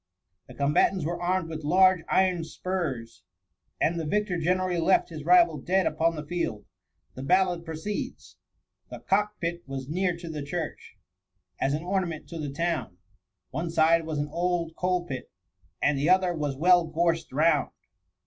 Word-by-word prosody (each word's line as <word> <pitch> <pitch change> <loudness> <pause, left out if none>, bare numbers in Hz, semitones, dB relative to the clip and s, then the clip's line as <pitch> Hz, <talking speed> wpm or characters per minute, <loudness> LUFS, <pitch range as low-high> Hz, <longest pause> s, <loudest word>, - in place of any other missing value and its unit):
The - - -12
combatants 150 +4 +2
were 170 +2 -3
armed 180 -1 0
with 160 -1 -6
large 185 +4 +5
iron 185 -3 +2
spurs, 155 -7 -4 0.6
and 170 +1 +1
the 160 - -3
victor 205 -1 0
generally 180 +1 +1
left 170 +3 +3
his 155 -3 -7
rival 170 -2 +5
dead 185 +6 +1
upon 165 +2 +1
the 150 -1 -6
field. 150 -11 -3 0.5
The 130 - -8
ballad 180 +3 +2
proceeds: 160 +5 -6
— - - -49
* - - -47
The - - -7
cock 210 +2 0
pit 170 0 -3
was 135 -1 -5
near 180 +1 0
to 170 0 -9
the 155 -2 -5
churchy 160 +4 -5 0.6
As 140 +2 +1
an 155 - -4
ornament 180 -4 -2
to 165 - -6
the 150 -2 -3
town; 165 - -2 0.5
One 165 +5 -3
side 165 0 +3
was 155 -2 -3
an 145 0 -2
old 170 0 -1
coal 180 -1 0
pit. 130 -5 -6 0.5
And 145 -1 +2
the 145 +4 +1
other 185 -1 +4
was 145 -4 -2
well 175 +3 +4
gorsed 165 +1 0
round. 155 +5 +2
170 Hz, 170 wpm, -27 LUFS, 155-180 Hz, 0.6 s, large